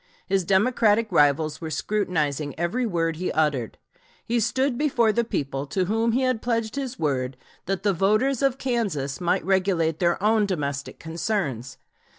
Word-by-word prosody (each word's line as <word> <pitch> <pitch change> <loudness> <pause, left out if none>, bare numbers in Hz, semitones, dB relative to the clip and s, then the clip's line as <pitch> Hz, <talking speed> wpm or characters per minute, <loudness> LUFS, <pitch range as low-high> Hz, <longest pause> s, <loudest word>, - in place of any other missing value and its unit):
His 190 -1 +1
Democratic 215 +3 +2
rivals 150 +2 +2
were 160 - -4
scrutinizing 155 -7 -1
every 230 +9 0
word 165 -4 -1
he 180 - -2
uttered. 145 -7 0 0.5
He 235 +1 +1
stood 260 +4 +1
before 240 -5 +2
the 235 +2 +1
people 140 - -3
to 185 +6 0
whom 225 +4 +1
he 260 +2 +1
had 255 -3 0
pledged 230 -2 -1
his 270 -3 -4
word 130 -4 -1 0.3
that 195 0 -2
the 205 -1 +2
voters 215 +9 +2
of 270 -2 +2
Kansas 195 - -2
might 175 - +1
regulate 180 -4 +1
their 170 -1 +2
own 215 -1 +3
domestic 140 -6 -3
concerns. 160 - -3
190 Hz, 160 wpm, -24 LUFS, 155-230 Hz, 0.5 s, own